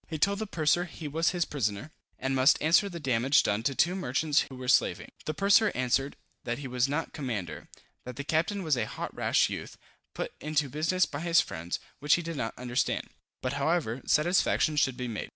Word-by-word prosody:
He 160 - -4
told 200 +6 +1
the 220 - -3
purser 170 0 +1
he 165 -3 -8
was 160 +3 +1
his 175 -2 0
prisoner, 120 0 -3 0.3
and 135 +1 -1
must 130 +1 +5
answer 170 +6 +3
the 170 -2 -7
damage 130 -1 +3
done 105 +1 0
to 135 +4 -1
two 175 +7 +3
merchants 150 -3 +1
who 135 - -9
were 130 0 -7
slaving. - - +2
The 155 - -3
purser 200 +3 +4
answered, 130 +2 0 0.3
that 120 0 -2
he 140 -1 -6
was 125 0 +1
not 150 +3 -2
commander; 115 - -5 0.4
that 125 0 -8
the 145 - -5
captain 170 +7 0
was 155 -4 +2
a 115 -3 -1
hot - - -6
rash - - +2
youth, - - -7 0.4
put - - -4
into 150 -2 0
business 160 +6 +1
by 145 - -6
his 170 0 +3
friends, 85 +2 -3 0.2
which 150 +2 +4
he 175 - -3
did 165 0 -5
not 115 -5 -4
understand; 125 0 -1 0.3
but 130 +1 -1
however, 140 -4 0
satisfaction 155 -1 +2
should 135 -3 +1
be 125 - -3
made. 110 -3 -5
145 Hz, 205 wpm, -29 LUFS, 125-165 Hz, 0.4 s, must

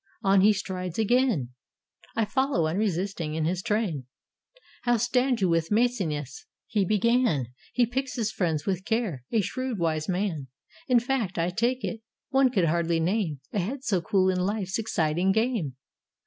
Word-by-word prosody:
On 195 0 +5
he 210 +2 +6
strides 185 -4 -4
again: 225 - +2 0.7
I 225 - +2
follow, 265 - +1
unresisting, 180 -2 -1
in 160 -1 0
his 180 +2 0
train. 185 - -1 0.7
"How 240 -1 +2
stand 245 +1 +1
you 190 - +4
with 165 -1 +1
Maecenas?" 195 - 0 0.2
he 210 -2 +1
began: 215 - +2 0.2
"He 245 - +3
picks 260 +3 -3
his 220 -4 -1
friends 160 -5 -1
with 190 -2 -1
care; 215 - -1
a 225 - +3
shrewd 255 +3 -3
wise 160 -2 -1
man; 180 -7 -1 0.4
In 250 -2 +5
fact, 235 -6 -1
I 170 +2 +1
take 240 +6 0
it, 225 - -3 0.3
one 270 -1 +4
could 195 -8 +2
hardly 170 +1 +1
name 165 - 0
A 205 - +1
head 255 +9 -3
so 190 -9 +1
cool 190 +2 +2
in 180 - -1
Hfe's 195 +1 -1
exciting 175 -3 +1
game. 220 - 0
195 Hz, 160 wpm, -27 LUFS, 170-235 Hz, 0.7 s, he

